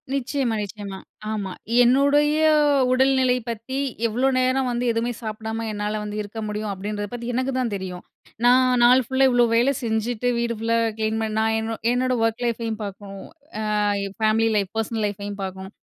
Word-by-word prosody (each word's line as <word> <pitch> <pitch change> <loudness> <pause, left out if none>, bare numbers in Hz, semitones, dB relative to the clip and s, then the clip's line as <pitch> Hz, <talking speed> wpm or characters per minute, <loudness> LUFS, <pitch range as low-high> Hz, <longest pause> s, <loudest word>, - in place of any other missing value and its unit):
நிச்சயமா. 265 -3 -1
நிச்சயமா. 200 -1 -7 0.3
ஆமா. 200 -3 -3 0.3
என்னுடைய 285 +4 +4 0.6
உடல்நிலை 260 -1 +3
பத்தி 235 +4 -5 0.3
எவ்ளோ 245 +4 0
நேரம் 255 0 +1
வந்து 240 +1 -1
எதுவுமே 230 +1 -1
சாப்பிடாம 220 0 -4
என்னால 210 0 -2
வந்து 210 0 -5
இருக்க 210 +2 -7
முடியும். 210 0 -3
அப்பிடின்றத 205 +2 -4
பத்தி 235 -1 -5
எனக்கு 255 +2 0
தான் 235 -5 -1
தெரியும். 185 -2 -6 0.4
நான் 250 0 +5
நாள் 250 +2 +6
ஃபுல்லா 265 +2 +3
இவ்ளோ 245 -1 +4
வேலை 245 +4 +3
செஞ்சுட்டு 230 +2 -1
வீடு 235 0 -1
ஃபுல்லா 230 +1 +1 0.2
கிளீன் 220 0 0
பண்ண 220 -1 -2
நான் 220 0 +1
என்னோ 225 0 -3 0.2
என்னோட 255 +1 +1
ஒர்க் 225 +1 0
லைஃப்பையும் 230 -2 -2
பார்க்கணும். 195 0 -9 0.5
ஆ - - +2 0.4
ஃபேமிலி 220 +1 +2
லைஃப் 200 -2 0
பெர்சனல் 225 -1 -1
லைஃப்பையும் 205 0 -5
பார்க்கணும். 190 +1 -7
225 Hz, 160 wpm, -23 LUFS, 210-250 Hz, 0.6 s, நாள்